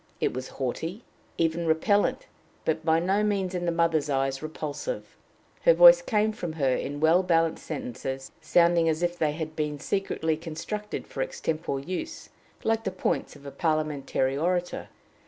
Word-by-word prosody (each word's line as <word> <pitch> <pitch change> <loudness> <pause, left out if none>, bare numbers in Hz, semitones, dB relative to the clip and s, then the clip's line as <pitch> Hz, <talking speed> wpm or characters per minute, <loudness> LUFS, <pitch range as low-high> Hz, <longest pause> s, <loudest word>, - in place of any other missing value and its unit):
It - - 0
was 130 +1 -4
haughty, 165 - -3 0.3
even 165 0 0
repellent, 205 - +2 0.4
but - - 0
by 160 -1 +3
no 190 +5 +1
means 195 -3 0
in 175 -1 -2
the - - +2
mother's 165 -3 +1
eyes 135 -1 0
repulsive. 155 - -5 0.5
Her - - +6
voice - - +9
came 215 - +1
from 175 -6 -5
her 135 -5 +1
in 145 +1 -4
well 160 +4 +5
balanced 165 -3 +1
sentences, 135 -2 -5
sounding 170 -1 +4
as 160 +2 -1
if 175 0 -1
they 150 -2 +1
had 155 0 -5
been 150 -1 -2
secretly 160 -3 -1
constructed 170 +6 -5
for - - -5
extempore 165 - -2
use, 315 - -5 0.3
like 225 0 +1
the - - -1
points 185 -4 -2
of 145 0 -15
a 140 - -6
parliamentary 145 -3 0
orator. 175 +4 -1
165 Hz, 160 wpm, -27 LUFS, 150-190 Hz, 0.5 s, voice